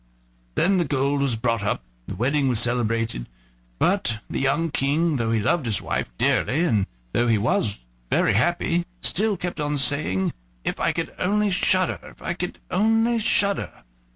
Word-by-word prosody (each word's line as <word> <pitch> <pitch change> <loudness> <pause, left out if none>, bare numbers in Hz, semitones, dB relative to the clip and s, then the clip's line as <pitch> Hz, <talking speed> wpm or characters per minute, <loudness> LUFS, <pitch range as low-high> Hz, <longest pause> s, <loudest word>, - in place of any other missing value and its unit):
Then 190 +1 +3
the 175 - +1
gold 140 0 0
was 135 -4 +2
brought 115 -1 0
up, 100 - -1 0.2
and - - -5
the - - -11
wedding 135 +4 +1
was 120 -4 +3
celebrated, 115 - 0 0.5
but 120 - +1
the - - -3
young 150 +4 +1
King, 150 +3 +1
though 115 -2 -1
he 115 - +2
loved 135 +5 +1
his 110 - +1
wife - - -2
dearly, 145 +6 +2
and 105 - +1 0.3
though 120 - +2
he 115 -2 +4
was 105 - 0 0.3
very - - +3
happy, 170 - +1
still 210 +1 +1
kept 175 -2 -4
on 145 0 0
saying: 125 -9 +1 0.3
"If - - -2
I - - +2
could - - -3
only 205 +2 +1
shudder! 185 0 +2
if - - -14
I 170 - -3
could 180 0 -4
only 225 +4 +2
shudder!" 200 - 0
140 Hz, 175 wpm, -24 LUFS, 115-180 Hz, 0.5 s, he